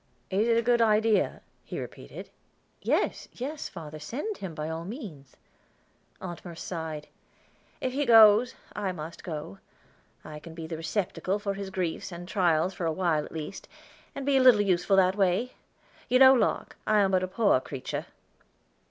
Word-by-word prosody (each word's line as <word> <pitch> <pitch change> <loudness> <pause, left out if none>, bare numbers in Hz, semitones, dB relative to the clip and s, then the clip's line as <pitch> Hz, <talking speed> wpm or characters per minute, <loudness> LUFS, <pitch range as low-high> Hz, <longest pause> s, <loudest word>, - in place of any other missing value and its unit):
"Is 205 +4 +2
it 230 -1 +3
a 230 - +2
good 240 0 +3
idea?" 220 -1 +2 0.2
he - - -6
repeated. - - -9 0.5
"Yes, - - 0
yes, 285 +5 -5
father; 155 -3 -9
send 290 - -4
him 180 -5 -7
by 155 0 -4
all 160 +1 -4
means." 180 - -9 0.8
Aunt 175 -2 -7
Merce 170 -2 -8
sighed. 160 -3 -5 0.7
"If 255 - -2
he 285 0 -1
goes, 225 +1 +7 0.2
I 195 -3 -2
must 165 0 -8
go; 150 - -6 0.7
I 155 0 -8
can 160 +1 -11
be 165 -1 -6
the 160 +1 -5
receptacle 185 +3 -2
for 205 -1 -3
his 195 0 -6
griefs 185 -1 -3
and 175 +1 -8
trials 180 -2 +2
for 175 -2 -3
a - - +1
while 160 -2 +1
at - - -10
least, 160 +4 -7 0.5
and 275 - -5
be 280 -1 +3
a - - +4
little 250 -5 +7
useful 195 0 +2
that 190 0 +4
way. 200 +5 +1 0.6
You 255 - +5
know, 265 0 +9
Locke, 250 - 0
I 215 - +4
am 195 -1 +2
but 185 -1 +3
a 185 - -1
poor 200 - +3
creature." 130 0 -5
190 Hz, 175 wpm, -28 LUFS, 165-225 Hz, 0.8 s, know